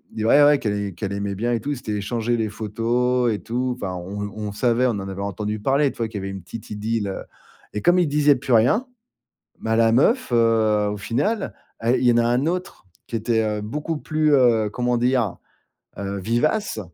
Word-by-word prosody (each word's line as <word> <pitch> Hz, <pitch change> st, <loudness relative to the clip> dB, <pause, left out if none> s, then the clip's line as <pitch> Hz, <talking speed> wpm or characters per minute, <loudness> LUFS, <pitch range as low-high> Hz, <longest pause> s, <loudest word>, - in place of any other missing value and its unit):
ils 110 Hz, -, -3 dB
se -, -, -1 dB
ouais, 145 Hz, +6 st, +6 dB
ouais, 145 Hz, -1 st, +5 dB
qu'elle 100 Hz, -3 st, -2 dB
qu'elle 100 Hz, +3 st, -4 dB
aimait 100 Hz, 0 st, -2 dB
bien 120 Hz, +5 st, -1 dB
et 115 Hz, -, 0 dB
tout, 145 Hz, +7 st, -4 dB
ils 145 Hz, -, -2 dB
s'étaient 110 Hz, -3 st, -5 dB
échangé 115 Hz, +3 st, -1 dB
les 110 Hz, -2 st, -1 dB
photos 120 Hz, +3 st, 0 dB
et 105 Hz, -, -3 dB
tout, 125 Hz, +2 st, -2 dB
enfin, 95 Hz, -2 st, -3 dB
on 100 Hz, +3 st, -5 dB
on 105 Hz, -1 st, -4 dB
savait, 120 Hz, +3 st, +1 dB
on 125 Hz, -, +3 dB
en 100 Hz, -3 st, -4 dB
avait 95 Hz, +1 st, -5 dB
entendu 105 Hz, +2 st, -3 dB
parler, 135 Hz, +5 st, +2 dB
tu -, -, -18 dB
vois, 115 Hz, -, -1 dB
qu'il 105 Hz, -2 st, -6 dB
y -, -, -6 dB
avait 95 Hz, -, -4 dB
une 95 Hz, -2 st, -7 dB
petite 105 Hz, +5 st, -9 dB
idylle, 105 Hz, 0 st, -2 dB
heu 95 Hz, -, -5 dB, 0.5 s
et 105 Hz, -, -3 dB
comme 175 Hz, +1 st, +4 dB
il 175 Hz, -, +3 dB
disait 145 Hz, 0 st, +4 dB
plus 130 Hz, -1 st, -2 dB
rien, 125 Hz, -, +4 dB, 0.8 s
bah, 115 Hz, 0 st, 0 dB
la 115 Hz, 0 st, +4 dB
meuf, 225 Hz, -, +2 dB
heu, 110 Hz, -3 st, +3 dB
au 105 Hz, -, -3 dB
final 140 Hz, -, -1 dB, 0.3 s
et 120 Hz, +2 st, +3 dB
il -, -, -1 dB
y 120 Hz, -, +6 dB
en -, -, +1 dB
a 120 Hz, -, +3 dB
un 125 Hz, +4 st, +1 dB
autre 180 Hz, -, -3 dB, 0.2 s
qui -, -, -9 dB
était, 115 Hz, 0 st, +1 dB
heu, 105 Hz, -1 st, -1 dB
beaucoup 150 Hz, +9 st, -3 dB
plus, 155 Hz, 0 st, 0 dB
heu, 115 Hz, -5 st, +4 dB
comment 125 Hz, +2 st, 0 dB
dire? 120 Hz, -5 st, +1 dB, 0.6 s
Heu, 100 Hz, 0 st, -3 dB
vivace 120 Hz, -, 0 dB
115 Hz, 225 wpm, -22 LUFS, 105-125 Hz, 0.8 s, ouais